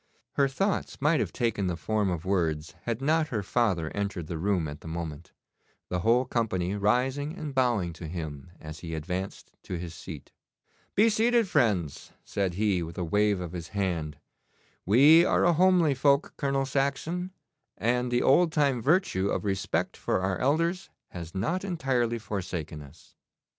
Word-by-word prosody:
Her 140 - +2
thoughts 195 +9 -1
might 150 +3 +3
have - - -1
taken 110 -5 -1
the 90 -2 -2
form 105 0 0
of 85 -1 -3
words 80 -5 0
had 120 +2 -2
not 155 +2 +2
her 110 -7 -2
father 95 -7 0
entered 100 -4 -3
the 80 0 -5
room 90 -3 +1
at 75 +1 -8
the - - -10
moment, 80 0 -6 0.6
the 90 - -1
whole 115 +7 +3
company 105 -7 -1
rising 130 - 0
and 150 -3 -5
bowing 120 -10 +1
to 80 0 -8
him 80 -4 -6
as 75 0 -9
he 80 -1 -5
advanced 90 +5 -5
to 90 - -5
his 85 -1 -6
seat. 80 -2 -9 0.6
'Be 215 +3 +5
seated, 230 +1 +3
friends,' 105 - 0
said 95 -3 -1
he, 100 -3 +1
with 85 +1 -7
a 90 - -1
wave 105 +3 +2
of 90 -2 -5
his 85 -2 -6
hand; 85 -6 -1 0.7
'we 145 - +7
are - - +2
a 175 - +5
homely 175 -3 +4
folk, 140 +2 +2
Colonel 135 -1 0
Saxon, 140 +7 -1 0.5
and 125 +2 +1
the 120 0 +1
old 165 +5 +4
time 140 -6 +2
virtue 135 - +2
of - - -2
respect 95 -1 -1
for - - -1
our 95 -1 -1
elders 165 +7 0 0.2
has 85 0 -8
not 165 - -1
entirely 130 - 0
forsaken 90 -8 -5
us. 70 +2 -16
105 Hz, 170 wpm, -28 LUFS, 85-140 Hz, 0.7 s, we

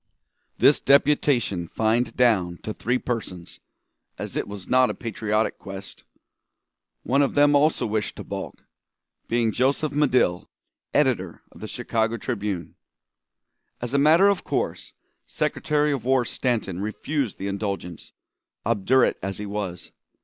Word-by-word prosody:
This - - +5
deputation 135 - +2
fined 115 +4 0
down 95 -8 +2
to 110 - -4
three 125 +4 0
persons, 100 -9 -5 0.6
as - - -6
it - - -2
was 100 -2 -8
not 130 0 +4
a - - -3
patriotic 110 -1 -1
quest. 95 0 -9 1.0
One 135 +3 +2
of 140 - +1
them 145 0 +5
also 150 +2 +3
wished 105 -2 -2
to - - -7
balk, - - -7 0.6
being 115 -1 +1
Joseph 135 +5 +1
Medill, 130 -11 +1 0.4
editor - - 0
of - - -16
the - - -5
Chicago 115 0 -1
Tribune. 100 -6 -4 1.1
As 120 +1 -4
a 140 - +3
matter 160 +7 +6
of 200 -2 +1
course, - - -3 0.3
Secretary 150 0 0
of 135 -5 -2
War 130 0 +2
Stanton 115 -8 -2
refused 115 +4 -2
the 95 - -5
indulgence, 100 -4 -4 0.5
obdurate 115 +4 +2
as 95 +1 -4
he 105 - -5
was. 100 -4 -5
115 Hz, 135 wpm, -24 LUFS, 100-135 Hz, 1.1 s, matter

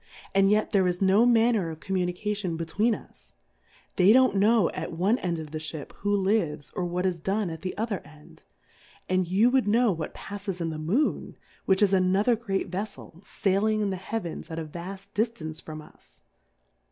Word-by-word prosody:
and 195 0 +4
yet 210 +1 +2
there 195 -3 +3
is 180 0 -1
no 195 +5 +4
manner 225 -6 +3
of 160 -1 -8
Communication 185 0 -2
between 205 +8 +1
us; - - -16 0.6
they 185 +3 +6
don't 255 -1 +5
know 210 -1 +4
at - - -5
one 190 +8 +1
end 175 -2 -2
of 155 -2 -7
the 155 - -4
Ship 155 -2 -6
who 205 - -1
lives, 190 -8 0
or 185 -3 -3
what 180 +1 -2
is 180 -2 0
done 195 +2 -1
at 160 - -7
the 185 - -5
other 215 -3 -1
end; 150 0 -17 0.7
and 185 -1 +1
you 205 +7 +3
wou\l 260 -1 +3
know 230 +1 +4
what 165 -3 -5
palTes 200 -2 -6
in 165 -1 -2
the 155 - -5
Moon, 200 - -1 0.3
which 190 +1 +3
is 200 -1 +3
another 190 +5 +3
great 195 -5 -3
Vef 195 +4 -2
fel, 170 - -14
faihng 210 +2 +1
in 200 - 0
the - - -2
Heavens 185 -3 -5
at 160 - -6
a 165 - -3
vaft 190 +5 -8
di 210 - +2
ftance 160 -10 -4
from 155 -1 -8
us. - - -20
190 Hz, 195 wpm, -27 LUFS, 170-210 Hz, 0.7 s, they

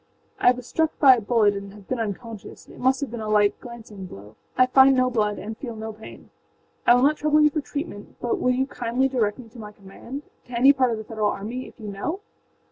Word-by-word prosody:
âI 250 - +5
was 250 -1 -9
struck 320 +4 -1
by 270 -3 +7
a - - -3
bullet 210 -2 +2
and 200 0 -7
have 205 -2 -15
been 255 - -2
unconscious. 225 0 -6
It - - -14
must 260 +2 +2
have 280 - -3
been 235 -2 -5
a 215 - -4
light, 210 -1 +3
glancing 220 -5 -10
blow: 105 - -13 0.2
I 255 - +6
find 265 +1 +6
no 255 0 +2
blood 210 -3 0
and 220 +2 -6
feel 235 -1 -7
no 220 0 -6
pain. 220 +1 -13 0.6
I 240 - +8
will 245 - +3
not 300 +2 +3
trouble 305 0 +2
you 300 0 +5
for 305 - -2
treatment, 285 -8 -7
but 240 - -1
will 250 - +1
you 255 +1 +1
kindly 245 0 -1
direct 230 -6 0
me 250 -3 -11
to 235 - -14
my 210 -1 -8
commandâto 210 +8 -10 0.3
any 255 +3 +5
part 260 -2 +2
of 225 - -2
the 220 - -6
Federal 215 -1 -1
armyâif 235 +7 -6
you 215 -2 -7
know? 315 - -4
235 Hz, 235 wpm, -24 LUFS, 210-260 Hz, 0.6 s, I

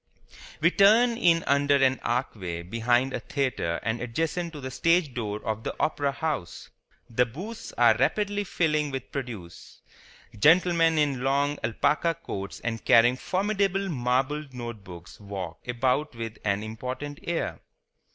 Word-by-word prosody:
We 170 +3 +5
turn 220 +6 +5
in 170 -7 +3
under 140 +1 +3
an 135 -1 +3
archway 95 -9 -2
behind 120 +7 +1
a - - -2
theatre 130 - -2
and 110 +1 -2
adjacent 165 +8 -2
to 150 - -7
the 130 -1 -6
stage 165 0 +2
door 105 -3 -4
of 110 0 -2
the - - -4
Opera 145 -2 +1
House. 140 - -4 0.4
The 125 +2 +1
booths 195 - -8
are 120 -2 +5
rapidly 205 - 0
filling 155 -5 0
with 135 -2 -6
produce. 115 -11 -8 0.6
Gentlemen 165 - +4
in 140 -4 +1
long 140 +2 +1
alpaca 150 +9 +1
coats 100 -11 -6
and 115 -2 -3
carrying 120 +2 +5
formidable 195 +6 0
marbled 135 +1 -1
note 120 -4 -6
books 90 -1 -12
walk 100 -4 -7
about 125 +3 0
with 115 -1 -6
an 100 0 0
important 130 +7 -6
air. 170 -1 -3
135 Hz, 140 wpm, -27 LUFS, 115-160 Hz, 0.6 s, We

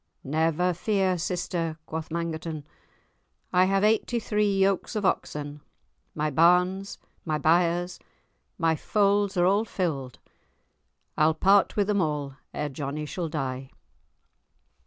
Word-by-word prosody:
"Never 160 +5 +1
fear, 190 +1 +1
sister," 165 -2 -2
quoth 160 0 -5
Mangerton, 165 -2 -4 0.9
"I 180 +1 +5
have 195 +1 +1
eighty 220 +3 +2
three 210 -2 0
yokes 195 +3 +1
of 210 -2 -1
oxen, 150 -4 -2 0.5
my 150 0 -1
barns, 180 +5 +3 0.3
my 155 -2 -1
byres, 175 +3 +1 0.6
my 165 -1 +2
folds 200 +2 +1
are 175 - +4
all 200 +4 +3
filled, 155 - -3 1.0
I'll 155 +1 +4
part 195 +4 +4
with 205 - +2
them 205 -1 +1
all 150 -4 -2 0.2
ere 150 - -3
Johnie 145 +2 -4
shall 165 +2 -4
die." 135 -3 -4
170 Hz, 120 wpm, -26 LUFS, 155-195 Hz, 1.0 s, I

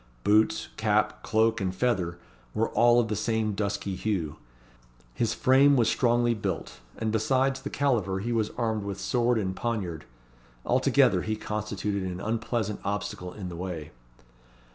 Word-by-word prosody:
Boots, 110 +1 +3
cap, - - +1
cloak, 110 0 +2
and 95 -1 -1
feather, 95 -6 0 0.4
were 115 - +1
all 120 0 +5
of 120 - +1
the 105 - -2
same 110 0 0
dusky 100 -1 -2
hue. 90 -7 -2 0.8
His 115 - 0
frame 140 +1 +5
was 120 -4 +3
strongly 120 -1 +2
built, 100 -7 -4 0.2
and 110 -1 -1
besides 130 +4 +1
the 140 - -5
caliver 110 -9 0
he 115 +5 -3
was 110 -2 +1
armed 110 -2 0
with 100 -1 -5
sword 120 -1 +1
and 95 -3 -1
poniard. 95 -10 -3 0.6
Altogether, - - +3
he 110 - -2
constituted 105 -2 -3
an 90 -1 -4
unpleasant 110 0 -2
obstacle 100 -3 -3
in 95 -2 -7
the 85 - -7
way. 85 -4 -5
110 Hz, 150 wpm, -27 LUFS, 95-120 Hz, 0.8 s, all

